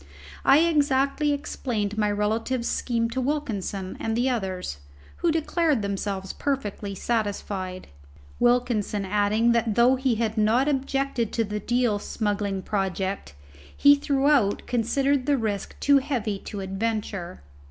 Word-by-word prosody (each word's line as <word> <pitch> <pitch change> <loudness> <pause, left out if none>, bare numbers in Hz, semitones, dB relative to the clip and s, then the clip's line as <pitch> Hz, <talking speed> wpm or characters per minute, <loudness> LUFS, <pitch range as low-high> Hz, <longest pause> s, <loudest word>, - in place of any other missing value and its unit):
I 280 +3 +6
exactly 290 -2 +2
explained 230 -7 -2
my 210 -1 +1
relative's 220 +4 -1
scheme 230 -2 0
to 260 +2 -1
Wilkinson 220 -9 -3
and 225 0 -1
the 255 +2 +2
others, 185 - -3 0.4
who 340 - +1
declared 315 - +1
themselves 195 -1 -3
perfectly 210 -7 -3
satisfied, 200 -4 -3 0.5
Wilkinson 240 -4 +1
adding 210 +4 +2
that 230 -2 +1
though 245 +3 +5
he 260 -2 +1
had 220 0 -1
not 230 +6 +3
objected 270 -4 -1
to 230 - +1
the 210 0 -3
Deal 240 -1 +1
smuggling 205 -3 -2
project 190 - -2 0.4
he 285 - +7
throughout 280 -6 +2
considered 270 +3 +1
the 285 -1 +3
risk 210 -4 -3
too 280 -1 +5
heavy 230 -7 -2
to 205 - -5
adventure. 195 - -3
225 Hz, 130 wpm, -25 LUFS, 205-265 Hz, 0.5 s, he